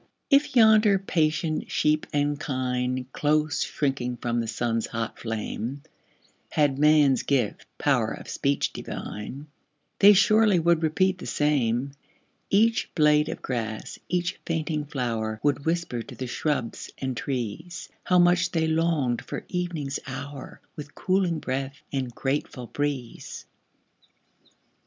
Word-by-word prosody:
If 280 -1 +4
yonder 215 -3 +6
patient 160 -4 0
sheep 155 0 +1
and 145 0 0
kine, 130 -3 -1
Close 150 0 +1
shrinking 125 -4 -1
from 120 -1 -1
the 115 - -2
sun's 115 0 -1
hot 115 -1 -4
flame, 115 +4 -4 0.7
Had 145 -3 +1
man's 150 -3 +5
gift 130 -7 -1
"power - - +2
of - - -8
speech 140 0 0
divine," 125 +8 -6 0.5
They 205 +1 +9
surely 215 0 +5
would 170 0 +3
repeat 180 +4 +1
the - - -7
same 140 -3 +1 0.6
Each 225 +3 +3
blade 150 -2 +4
of - - -6
grass, 115 -4 -4
each 175 0 -1
fainting 155 -2 -2
flower, 115 -6 -2
Would 145 -1 +1
whisper 165 -8 -1
to - - -10
the 130 - -5
shrubs 125 -1 -2
and 130 -1 -3
trees, 135 - -4 0.2
How 180 - +3
much 175 +1 +4
they 160 -1 0
longed 160 -6 +1
for - - -6
evening's 170 -6 -2
hour, 135 +1 -7
With 145 -1 -9
cooling 185 -3 +1
breath 135 0 -3
and 135 -2 -1
grateful 135 -2 -2
breeze. 140 -2 -4
145 Hz, 130 wpm, -26 LUFS, 125-170 Hz, 0.7 s, They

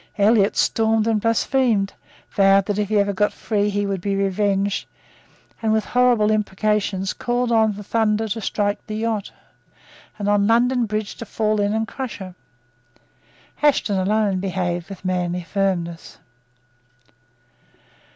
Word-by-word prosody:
Elliot 205 0 +3
stormed 220 -1 +2
and 225 -2 +1
blasphemed, 230 -2 +1 0.4
vowed 195 0 +4
that, 205 0 -2
if 210 -1 -1
he 215 - +2
ever 200 0 +2
got 205 +2 +1
free, 205 -2 -1
he 205 0 -1
would 195 -2 -2
be 200 +1 -1
revenged, 195 0 0 0.7
and, 220 -1 +1
with 220 0 +1
horrible 245 -4 +3
imprecations, 210 -2 0
called 245 0 -1
on 220 -2 +3
the 205 - -8
thunder 220 +1 0
to 225 +2 -3
strike 205 0 -1
the 215 - -4
yacht, 220 -2 -2 0.9
and 205 -1 -3
on 205 0 +3
London 240 +1 +2
Bridge 215 0 -3
to 230 - -7
fall 215 0 0
in 205 0 +1
and 220 +1 -1
crush 260 -1 -6
her. 185 -2 -8 1.3
Ashton 270 -9 +2
alone 200 0 +1
behaved 180 -2 -2
with 195 -1 -10
manly 180 -1 -1
firmness. 175 -3 -2
205 Hz, 140 wpm, -21 LUFS, 195-220 Hz, 1.3 s, vowed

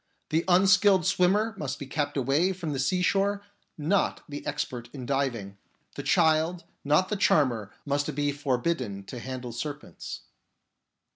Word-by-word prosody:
The 160 +2 +1
un 185 +1 +5
skilled 190 -2 +5
swimmer 205 +5 +2
must 140 -2 -3
be 140 - -7
kept 145 +1 -2
away 140 +8 +2
from 170 -5 -4
the 135 - -3
sea 180 +7 +1
shore, 200 +2 +1 0.3
not 165 +6 0
the 145 0 -7
expert 120 -2 -3
in 130 -4 -7
diving. 120 -8 -2 0.3
The - - -5
child, 160 +2 +2 0.2
not 150 +6 +3
the 210 - 0
charmer, 120 - +2
must 145 0 -1
be 145 0 +1
forbidden 130 -6 -1
to 120 +5 -8
handle 125 0 -6
serpents. 145 +5 -6
145 Hz, 150 wpm, -27 LUFS, 130-180 Hz, 0.3 s, un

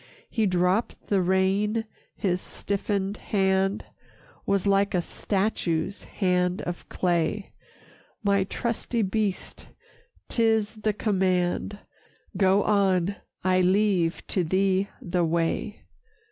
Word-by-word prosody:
He 220 -3 +1
dropped 180 +4 0
the 200 -2 +3
rein, 195 +4 +1 0.3
his 185 -2 -1
stiffened 200 0 -2
hand 195 0 +1 0.6
Was 200 -1 +1
like 200 0 +2
a 180 - +2
statue's 190 -3 -1
hand 180 -2 0
of 175 0 -6
clay; 175 +3 0 0.7
"My 200 -1 +3
trusty 230 +3 -2
beast, 200 0 -2 0.6
'tis 220 -2 +2
the 215 0 0
command, 190 -1 0 0.6
Go 195 +1 +4
on, 195 -2 +2 0.3
I 185 0 +3
leave 185 -2 +2
to 185 - 0
thee 190 +3 +1
the 175 -1 0
way. 170 +5 -1
195 Hz, 105 wpm, -26 LUFS, 180-205 Hz, 0.7 s, Go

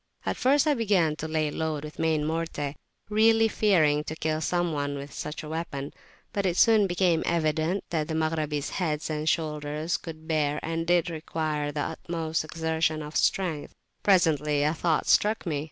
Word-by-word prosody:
At - - 0
first 280 +3 +3
I 300 - +4
began 195 - +2
to 160 - -4
lay 155 -1 0
on 145 - -5
load 155 -2 -2
with 150 0 -9
main 160 -2 +1
morte, 160 -3 -2 0.3
really 225 +1 +4
fearing 160 -10 +3
to 155 - -5
kill 155 0 -1
some 175 0 0
one 145 -1 -2
with 140 +1 -8
such 150 +2 -5
a - - -7
weapon; 155 -3 -4 0.4
but 200 - 0
it 180 -2 0
soon 220 -3 +5
became 175 -2 +2
evident 165 +2 0
that 155 -3 0
the 160 - -3
Maghrabis' 155 -2 -1
heads 155 -4 -2
and 155 +1 0
shoulders 150 0 -1
could 160 -1 -10
bear 150 -3 +1
and 165 0 -2
did 175 0 +2
require 155 -2 -2
the 145 0 -3
utmost 160 0 -3
exertion 160 -1 -1
of 150 +1 -9
strength. 170 -6 0 0.3
Presently 150 -6 +3
a 150 +1 +2
thought 165 -1 0
struck 210 0 +3
me. 155 -4 -1
160 Hz, 180 wpm, -27 LUFS, 150-175 Hz, 0.4 s, soon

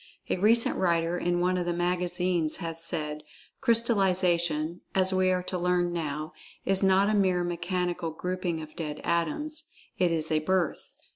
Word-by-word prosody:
A - - +1
recent 225 +5 +3
writer 170 -2 +1
in 175 0 0
one 180 +1 +1
of 175 - -3
the 175 - +1
magazines 175 -2 0
has 165 -2 -4
said, 150 -2 0 0.4
"Crystallization, 180 - +1
as 190 0 +3
we 185 0 +3
are 180 -1 +1
to 180 0 -3
learn 175 0 +1
now, 155 -2 -4 0.3
is 195 0 +2
not 195 +1 +4
a 215 - +1
mere 185 -3 +2
mechanical 175 0 -2
grouping 175 0 -3
of 155 - -12
dead 150 -3 -5
atoms. 295 - -1 0.3
It 180 -2 +3
is 160 -1 -1
a 155 - +3
birth." 180 +1 -1
175 Hz, 160 wpm, -28 LUFS, 165-185 Hz, 0.4 s, not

